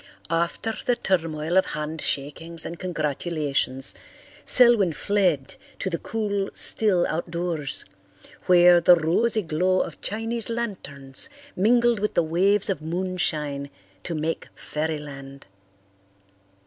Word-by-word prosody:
After 170 +7 -1
the 245 - +1
turmoil 165 -5 -1
of 190 - +4
handshakings 150 +1 -3
and 170 - -7
congratulations, 150 -5 -1 0.5
Selwyn 235 - +5
fled 180 -7 0 0.2
to 190 - -3
the 170 - -2
cool, 205 -3 -2
still 195 -5 +4
outdoors, 170 -3 -2 0.6
where 175 -1 +6
the 175 +1 +7
rosy 200 +7 +1
glow 180 +3 +1
of - - -6
Chinese 225 +2 -2
lanterns 150 - -2 0.3
mingled 235 +3 +3
with 210 +1 -2
the 170 - +3
waves 190 +5 +2
of 190 -7 -2
moonshine 155 -5 -2 0.3
to 165 - -5
make 155 +1 -3
fairyland. 145 -3 -5
170 Hz, 110 wpm, -24 LUFS, 155-200 Hz, 0.6 s, the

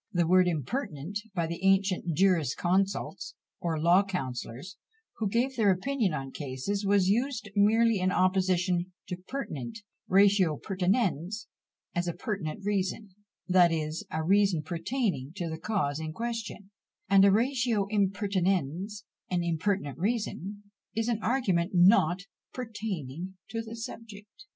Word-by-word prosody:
The 175 -2 +2
word 185 +2 +5
impertinent, 170 - -3 0.2
by 170 -2 +1
the 170 +2 -5
ancient 190 -4 +2
jurisconsults, 185 +2 +1 0.2
or 165 -2 -1
law 170 +4 +5
counsellors, 135 - -5 0.4
who 215 -3 -1
gave 250 +5 0
their 215 -4 +3
opinion 210 +2 +1
on 135 -3 -4
cases, 145 +10 -3
was 200 -2 +3
used 235 +2 0
merely 220 +1 +4
in 185 0 +1
opposition 185 -1 +1 0.2
to 180 - -3
pertinent 180 - -5 0.3
ratio 195 -5 +4
pertinens 190 - -1 0.5
is 175 0 0
a 170 - -1
pertinent 195 -2 -4
reason, 200 +1 -1 0.4
that 180 -2 +5
is, 155 0 -2
a 160 0 -2
reason 195 -2 +3
pertaining 170 - -2
to 175 -4 -3
the 160 - -5
cause 165 -7 -1
in 155 -1 -5
question, 225 -2 -5 0.4
and 195 0 +6
a 200 - +7
ratio 235 -1 +2
impertinens, 195 -2 0 0.3
an 180 -1 0
impertinent 165 - -1
reason, 205 -1 -2 0.3
is 225 +1 0
an 225 -2 0
argument 200 -8 +1
not 180 -1 +5 0.3
pertaining 190 - -5
to 230 - -3
the 225 0 -8
subject. 225 - -9
190 Hz, 130 wpm, -29 LUFS, 170-210 Hz, 0.5 s, a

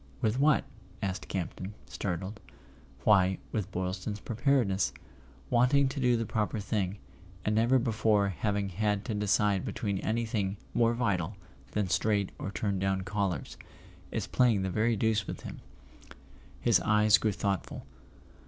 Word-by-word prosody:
"With 110 +3 +1
what?" 150 0 +4 0.4
asked 95 -1 -3
Campton, 95 +2 -4
startled. 95 +8 -4 0.6
"Why, 95 -1 +4
with 105 -3 -2
Boylston's 95 +3 -3
Preparedness. 115 -1 +1 0.6
Wanting 125 +3 +4
to 140 +1 -5
do 125 -2 +3
the 115 - -1
proper 110 0 -1
thing—and 95 -1 -4
never 115 +4 +4
before 110 -4 +2
having 100 +1 -1
had 105 +2 -1
to 110 - -2
decide 105 -1 +2
between 100 -5 -2
anything 110 -3 -1 0.2
more 115 0 +3
vital 100 -5 -1 0.4
than 105 -2 0
straight 100 +3 +1
or - - -3
turned 100 0 -2
down 95 0 +1
collars. 95 -6 -2 0.5
It's - - -2
playing 115 -6 +3
the 95 - -1
very 110 +4 +2
deuce 110 -1 +1
with - - -5
him." - - -8 1.0
His 115 -5 +4
eyes 105 0 +4
grew 110 - +1
thoughtful. 95 -6 -3
105 Hz, 135 wpm, -30 LUFS, 95-110 Hz, 1.0 s, what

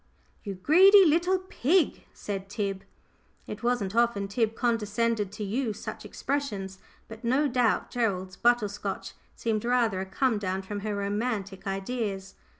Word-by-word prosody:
"You 200 -2 -5
greedy 375 - +7
little 345 +4 +3
pig!" 365 -2 0
said 195 -1 -6
Tib. 195 -2 -3 0.6
It - - -7
wasn't 235 -5 0
often 235 -4 +2
Tib 220 +2 0
condescended 230 -3 0
to 210 0 -5
use 220 +1 -2
such - - -7
expressions, 205 -10 -3 0.3
but 225 +1 -11
no 265 +5 +2
doubt 245 -4 +1
Gerald's 190 -6 -1
butter 240 -1 +3
scotch 205 +1 -5 0.2
seemed 220 -2 -1
rather 235 -5 +1
a 190 - -5
come 235 +2 +1
down 190 -1 -2
from 205 +2 -5
her 210 0 -3
romantic 200 -1 -3
ideas. 195 -1 -3
220 Hz, 145 wpm, -28 LUFS, 195-245 Hz, 0.6 s, greedy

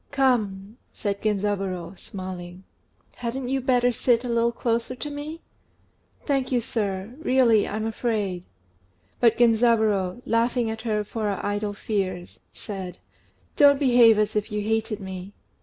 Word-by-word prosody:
"Come," 220 -6 0
said 200 -2 -3
Genzaburô, 195 -4 -1
smiling, 185 -1 -8 0.5
"hadn't 250 +1 -4
you 270 0 0
better 245 -1 +3
sit 240 0 +2
a - - -4
little 235 0 +2
closer 235 +1 -1
to 295 +4 -5
me?" 300 +3 -6 0.8
"Thank 270 -3 0
you, 250 - +3
sir; 205 -2 -3
really 250 -6 +4
I'm 215 +1 -3
afraid." 210 -5 -2 0.8
But 230 -2 +4
Genzaburô, 225 -3 +3
laughing 230 0 +1
at 220 0 -6
her 215 -2 -1
for 215 +1 -4
her 200 -2 -1
idle 205 0 -1
fears, 190 -4 -3
said 190 -4 -7 0.6
"Don't 285 -1 +6
behave 245 -5 +6
as 215 0 +1
if 210 +1 -1
you 210 0 -2
hated 220 0 -1
me." 190 +1 -7
220 Hz, 140 wpm, -25 LUFS, 200-245 Hz, 0.8 s, Don't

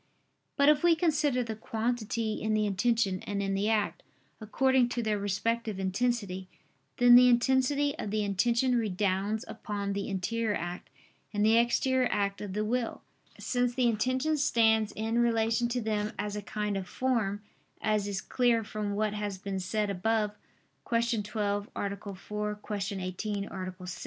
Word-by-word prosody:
But 280 0 +4
if 300 0 +5
we 345 -1 +5
consider 300 -6 +1
the 225 -2 -5
quantity 225 0 -2
in 215 0 0
the 215 0 +2
intention 200 -1 +1
and 205 -1 -2
in 195 0 -1
the 200 +2 0
act, 215 -2 0 0.4
according 255 +3 +2
to 240 -1 -2
their 215 -2 0
respective 210 +1 -1
intensity, 195 -1 -1 0.5
then 245 -2 +7
the 250 +1 +9
intensity 265 +4 +2
of 210 - -3
the 215 +1 0
intention 235 +5 +2
redounds 205 -1 0
upon 200 -1 -4
the 200 +1 -3
interior 210 +3 -1
act 175 +1 -5 0.4
and 205 0 +1
the 220 +1 +5
exterior 250 +2 +2
act 200 -1 -1
of 205 -2 -5
the 210 +1 -1
will: 240 +1 -2 0.3
since 245 -1 0
the 255 -2 +2
intention 255 +7 +1
stands 220 -6 +3
in 225 +2 -1
relation 230 0 +2
to 245 +1 -1
them 215 0 -1
as 205 0 -3
a 210 - -3
kind 210 -1 -3
of 190 -2 -5
form, 220 -6 -1 0.4
as 215 -2 0
is 200 -1 -3
clear 240 -3 +2
from 210 -1 -3
what 210 0 0
has 205 -2 -3
been 195 0 -4
said 205 +2 -1
above 210 +2 0 0.6
(Q. 235 -1 +1
12, 205 -1 -2
A. 200 0 -4
4; 210 +2 -4
Q. 210 0 -5 0.2
18, 200 +2 -3
A. 185 -1 -5
6). 180 -1 -7
215 Hz, 165 wpm, -29 LUFS, 200-240 Hz, 0.6 s, the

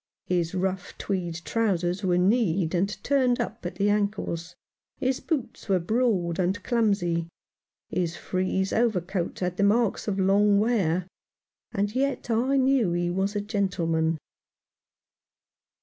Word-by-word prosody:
His 175 0 0
rough 185 0 -2
tweed 180 -4 -2
trousers 185 -4 0
were 180 -2 +2
kneed 185 -3 +2
and 195 +3 -1
turned 260 -3 +2
up 235 -1 -4
at 175 - -7
the 205 +1 +2
ankles; 200 -5 -2 0.4
his 260 +1 0
boots 270 -9 -4
were 190 - +4
broad 185 -3 0
and 185 +2 0
clumsy; 200 -8 +1 0.6
his 175 -2 -2
frieze 185 +1 -1
over 225 -4 +2
coat 175 0 -4
had 180 0 -1
the 200 - +2
marks 220 +2 +2
of 200 -2 -1
long 200 +2 +4
wear; 190 -6 +1 0.7
and 205 +1 -1
yet 270 -1 -1
I 255 +5 +2
knew 260 -8 +3
he 175 0 0
was 195 +3 -1
a 205 - 0
gentleman. 170 -6 0
195 Hz, 135 wpm, -26 LUFS, 175-225 Hz, 0.7 s, were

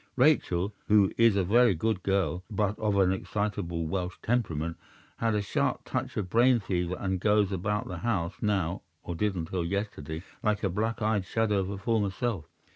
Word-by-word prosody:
Rachel—who 105 - +3
is 115 -3 +5
a 100 - +2
very 115 +2 +4
good 110 +3 0
girl, 95 -3 0
but 105 0 -1
of 105 -2 +1
an 95 -2 +4
excitable 95 -4 -2
Welsh 90 +2 -3
temperament—had 105 +1 -2
a 105 - 0
sharp 100 - 0
touch - - -3
of 100 - -1
brain 120 +4 +4
fever, 90 -3 -1
and 95 -1 -1
goes 105 0 +3
about 105 +5 -1
the - - -5
house 100 -8 -1
now—or 90 -4 -2
did 100 +3 0
until 85 +1 -2
yesterday—like 100 +2 -3
a 100 - +2
black 110 +4 -1
eyed 105 -2 +1
shadow 110 -3 +1
of 95 - -1
her 100 0 -4
former 105 0 +1
self. 95 -4 -2
100 Hz, 165 wpm, -29 LUFS, 90-110 Hz, -, is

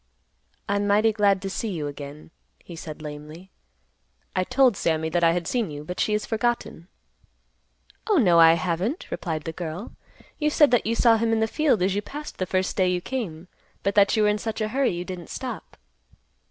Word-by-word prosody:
"I'm 200 0 0
mighty 215 +2 +3
glad 200 -3 +2
to 195 - -3
see 225 - -3
you 165 -6 -3
again," 145 +2 -8 0.3
he 170 - -12
said 155 -1 -8
lamely. 150 +5 -9 0.8
"I 185 - +2
told 255 +2 +3
Sammy 160 -2 0
that 170 +2 0
I 165 0 +5
had 175 -1 -2
seen 235 -3 -1
you, 145 0 -7
but 180 +4 -6
she 210 - +1
has 210 - 0
forgotten." 230 -7 -2 1.2
"Oh, 420 - +4
no, 180 - +5
I 165 0 +8
haven't," 180 - -2
replied 160 -4 -3
the 165 - -4
girl. 175 +4 -6 0.5
"You 300 -1 +2
said 295 -3 +4
that 245 -3 +2
you 230 - +1
saw 230 -1 +5
him 225 0 0
in 225 - +2
the 220 - +3
field 250 - +1
as 190 +1 +1
you 205 - -1
passed 295 +7 -8
the 185 - -1
first 185 +1 -1
day 185 -2 +2
you 180 0 0
came, 180 -7 -5 0.4
but 200 - +1
that 200 +2 +4
you 215 - +4
were 210 - +4
in 210 0 0
such 220 +1 -4
a 215 -1 -1
hurry 265 +3 +1
you 175 0 -4
didn't 180 -2 -7
stop." - - -7
190 Hz, 205 wpm, -25 LUFS, 165-225 Hz, 1.2 s, I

